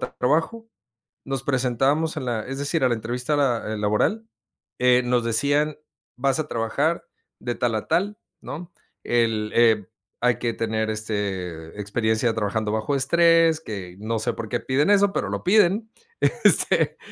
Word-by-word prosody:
t - - -5
trabajo, 165 - 0 0.6
nos 135 -2 -3
presentábamos 135 +4 +1
en 145 -4 -4
la 115 -3 -2
es 135 +1 -5
decir, 145 +2 0
a 130 - +4
la - - +2
entrevista 125 +6 -2
la 120 -6 0
eh, - - -3
laboral, 105 - 0 0.5
eh, 125 0 +5
nos 125 -1 +1
decían: 145 +6 +1 0.4
"Vas 135 +3 +1
a 155 - -2
trabajar 140 +10 -1 0.3
de 120 -1 -3
tal 120 -2 0
a 110 - -3
tal, 205 +3 0 0.2
¿no? 165 +4 -8 0.3
El 115 -3 0
eh, 110 -5 +4 0.3
hay 125 -1 +2
que 120 -2 -1
tener 110 -1 -1
este, 100 -6 -4
experiencia 110 +2 0
trabajando 110 0 -1
bajo 110 +6 -1
estrés". 165 +3 +4
Que, 95 - -7
no 110 +2 -2
sé 120 +2 -1
por 110 -1 -6
qué 120 - -1
piden 140 +6 +1
eso, 200 -1 +4
pero - - -1
lo - - -4
piden 210 +2 +3 0.3
este, - - +3
125 Hz, 160 wpm, -24 LUFS, 110-150 Hz, 0.6 s, eh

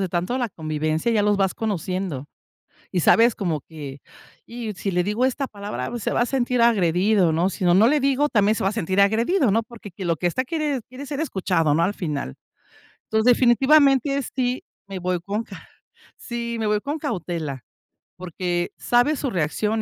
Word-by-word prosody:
de 190 - -1
tanto 180 +8 -1
la 245 -2 -1
convivencia, 155 +4 -2
ya 210 - +2
los 205 0 +2
vas 195 -1 +1
conociendo, 185 - -3 0.7
y 180 - 0
sabes 230 +7 +5
como 165 -7 -2
que: 145 -3 -9 0.4
"Y 230 -2 -6
si 195 +1 -3
le 180 0 +1
digo 210 +6 0
esta 265 +1 -1
palabra, 205 +3 -5
se - - -2
va - - +1
a - - +3
sentir 250 -1 0
agredido", 195 -4 +3
¿no?, 170 +4 +1
sino 180 -2 +1
no 210 +6 +6
le 295 +3 +3
digo, 275 +2 +2
también 210 -2 +3
se - - -3
va 190 - +2
a - - -3
sentir 190 +1 -1
agredido, 225 - +3
¿no?, 225 +3 +2
porque 220 -3 -12
que 185 +2 -7
lo 170 -1 +1
que 175 - 0
esta 255 +9 -1
quiere 295 -3 -2
quiere 255 +3 -8
ser 285 0 -5
escuchado, 180 - 0
¿no?, 165 +3 +2
al 195 +4 +1
final, 150 - -4 0.8
entonces, 220 0 +2
definitivamente 270 +2 +4
es 280 - -3
sí, 250 0 0 0.2
me 195 -1 -6
voy 180 0 -1
con 205 +3 -2
calma - - -12 0.5
sí, 235 -1 -5
me 220 - -1
voy 210 0 +2
con 290 +8 -4
cautela, 170 - -4 0.5
porque 175 0 -3
sabes 245 +5 +2
su 275 - -1
reacción 210 +7 -1
210 Hz, 195 wpm, -23 LUFS, 175-245 Hz, 0.8 s, no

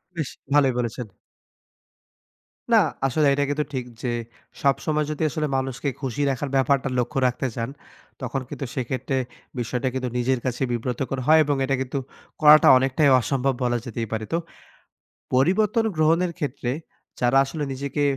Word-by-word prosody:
বেশ 155 -5 -2 0.2
ভালোই 135 -3 +4
বলেছেন। 120 -1 -3 1.7
না। - - +8 0.3
আসলে 150 +3 +1
এটা 145 0 +1
কিন্তু 150 +1 0
ঠিক, 130 -1 -2 0.2
যে 125 - -1 0.5
সবসময় 150 +2 +1
যদি 155 +1 -3
আসলে 155 +1 -1
মানুষকে 130 +1 -2
খুশি 135 +1 -2
রাখার 135 +1 -3
ব্যাপারটা 135 0 +2
লক্ষ্য 125 +2 -1
রাখতে 125 +2 -1
যান। 115 +2 -2 0.5
তখন 130 +2 -2
কিন্তু 140 - -5
সেক্ষেত্রে 130 +1 -2 0.4
বিষয়টা 125 +2 -1
কিন্তু 130 -1 -2
নিজের 130 +1 +1
কাছেই 130 +1 -1
বিব্রতকর 125 +2 -2
হয়। 160 +1 +7
এবং 145 -1 0
এটা 135 0 0
কিন্তু 135 +1 -2 0.4
করাটা 150 0 +8
অনেকটাই 135 +3 +2
অসম্ভব 135 +1 0
বলা 120 -1 +1
যেতেই 115 -1 -4
পারে। 110 0 -2
তো, 165 - +2 1.0
পরিবর্তন 200 - +3
গ্রহনের 165 +3 +2
ক্ষেত্রে 135 -4 -2 0.5
যারা 125 +2 +3
আসলে 150 +2 -4
নিজেকে 140 +2 -2
135 Hz, 145 wpm, -24 LUFS, 125-145 Hz, 1.7 s, না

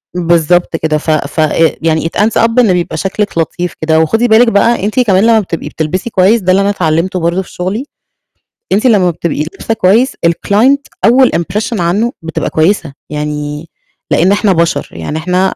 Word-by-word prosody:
بالضبط 175 0 +1
كده. 155 -1 -1
ف 155 +1 -2
ف 150 0 -2
آآ، 155 +1 +2
يعني 160 0 0
it - - -1
ends 220 +2 +2
up 230 +2 +2
إن 215 -7 +4
بيبقى 170 -2 -2
شكلِك 195 +1 -3
لطيف 175 +1 -2
كده. 160 0 +2
وخدي 225 +10 +1
بالِك 230 +2 +5
بقى 230 0 +2
أنتِ 215 +5 -1
كمان 200 -5 +3
لمّا 225 -1 +4
بتبقي 170 -5 -5
بتلبسي 180 +8 -3
كويس، 205 +3 +2
ده 185 0 +1
اللي 195 +2 +3
أنا 200 - +1
اتعلّمته 180 0 -1
برضه 170 +3 0
في - - -13
شغلي، 195 +9 -3 0.9
أنتِ 210 +6 +1
لمّا 190 -6 +3
بتبقي 160 -2 -3
لابسة 170 +7 -4
كويس 225 +6 +2
الclient 220 +11 +2 0.3
أول 255 +3 +4
impression 205 +5 -2
عنه 205 +8 0
بتبقى 165 0 -4
كويسة، 160 -2 0 0.2
يعني 150 +1 -5 0.4
لإن 185 +4 +3
إحنا 205 -1 +2
بَشَر، 170 0 -1
يعني 85 - -5
إحنا 180 +3 0
أ - - -7
180 Hz, 185 wpm, -12 LUFS, 160-210 Hz, 0.9 s, بالِك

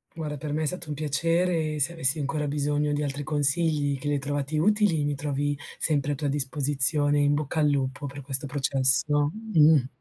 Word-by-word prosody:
Guarda, 150 -2 -4
per 145 +1 -5
me 155 +1 -1
è - - 0
stato 180 +1 -3
un - - -2
piacere 160 +2 0
e - - -5
se 165 +5 0
avessi 150 -2 +1
ancora 150 +1 -2
bisogno 145 +1 -1
di 145 0 -1
altri 145 0 -3
consigli 145 -1 0
che 145 - -4
li 145 - +1
hai - - 0
trovati 145 +2 -2
utili, 200 -4 +2
mi 145 0 -1
trovi 145 0 -2 0.2
sempre 145 -2 +1
a - - -1
tua 145 +1 -3
disposizione, 145 +1 +1
in 145 0 +3
bocca 150 +1 -1
al 150 -1 +3
lupo 135 0 -2
per 140 +1 -8
questo 135 +1 -3
processo. 140 +1 +1 0.2
Mh. 150 -4 +5
145 Hz, 205 wpm, -26 LUFS, 140-155 Hz, 0.2 s, Mh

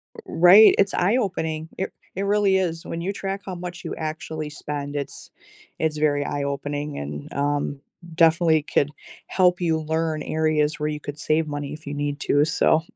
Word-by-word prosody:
R 455 - -9
right, 190 - +7
it's 195 0 +2
eye 195 +7 +2
opening, 160 -8 -2
it 190 - -2 0.2
it 195 - -2
really 200 -1 +3
is, 170 -3 -1
when 165 - -5
you 190 +4 -2
track 195 0 -4
how 190 - -5
much 175 0 -7
you - - -3
actually 155 -1 -4
spend, 145 -1 -5
it's 140 -2 -6 0.5
it's 155 -1 0
very 145 -1 +1
eye 145 - -2
opening 145 +1 -3
and, 75 0 -6
um, 145 0 -1 0.4
definitely 160 -2 +4
could 145 -1 +1 0.4
help 180 -1 +3
you 165 -2 +1
learn 160 0 -1
areas 155 0 +1
where 150 0 -1
you 150 -1 -4
could 145 0 -7
save 155 +1 +1
money 145 -1 -4
if 155 +1 -11
you 145 - -4
need 145 0 -2
to, 145 +1 +3
so. 160 0 +3
155 Hz, 185 wpm, -24 LUFS, 145-175 Hz, 0.5 s, right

